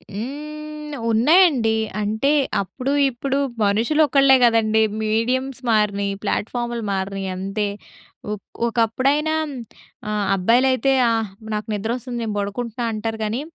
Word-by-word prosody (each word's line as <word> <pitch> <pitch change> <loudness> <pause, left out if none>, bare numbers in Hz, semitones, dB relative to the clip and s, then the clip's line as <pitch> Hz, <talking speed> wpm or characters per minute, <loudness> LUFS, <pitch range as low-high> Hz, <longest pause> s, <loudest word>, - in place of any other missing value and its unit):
హ్మ్. 300 +6 -7
ఉన్నాయండి. 250 -2 +4 0.2
అంటే 220 +7 0 0.3
అప్పుడు 255 +8 -4 0.2
ఇప్పుడు 270 +3 -2 0.3
మనుషులు 225 +10 +1
ఒకళ్ళే 275 0 +5
కదండీ! 220 -2 +3 0.2
మీడియమ్స్ 245 +4 -1
మారినియి. 200 -2 +1
ప్లాట్‌ఫామ్‌లు 240 +3 -2
మారినియి, 195 0 -3
అంతే. 195 +3 -2 0.7
ఒక్ 210 - -6 0.2
ఒకప్పుడైనా 260 +7 +1 0.7
ఆహ్, 210 -1 -1
అబ్బాయిలైతే, 250 +7 +3 0.2
ఆహ్, 225 -2 0 0.3
నాకు 210 - -3
నిద్రొస్తుంది. 240 +4 -3
నేను 215 -2 -3
బడుకుంటున్నా, 230 +4 -3
అంటారు 220 +1 -3
కానీ 220 +5 -2
230 Hz, 105 wpm, -21 LUFS, 210-265 Hz, 0.7 s, ఒకళ్ళే